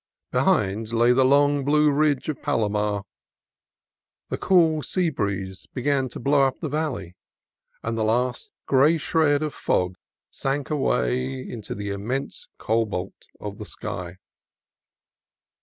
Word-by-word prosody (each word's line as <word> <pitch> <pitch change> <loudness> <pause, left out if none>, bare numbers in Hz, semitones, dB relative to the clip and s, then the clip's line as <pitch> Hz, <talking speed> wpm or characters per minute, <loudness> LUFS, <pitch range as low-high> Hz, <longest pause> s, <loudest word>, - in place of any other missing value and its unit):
Be - - +1
hind 110 +3 +1
lay 120 +1 +4
the 130 +1 +4
long 145 +1 +4
blue 150 +1 +4
ridge 145 -2 +1
of 155 -4 -3
Palomar. 105 -2 0 1.3
The - - -2
cool 165 -4 +4
sea 175 +1 0
breeze 95 -6 -3
began 135 0 +1
to - - -8
blow 140 +2 +3
up 130 - -5
the 155 - -3
valley, 130 - -3 0.7
and 115 0 -2
the 110 - 0
last 120 +3 0
gray 140 +5 +4
shred 155 -1 +2
of 150 - -2
fog 90 0 0 0.4
sank 140 +2 -2
away 130 -2 0
into 110 -4 -6
the 100 0 -4
intense 115 +8 -4
cobalt 105 -4 -2
of - - -7
the - - -6
sky. 90 0 -6
130 Hz, 135 wpm, -24 LUFS, 105-145 Hz, 1.3 s, lay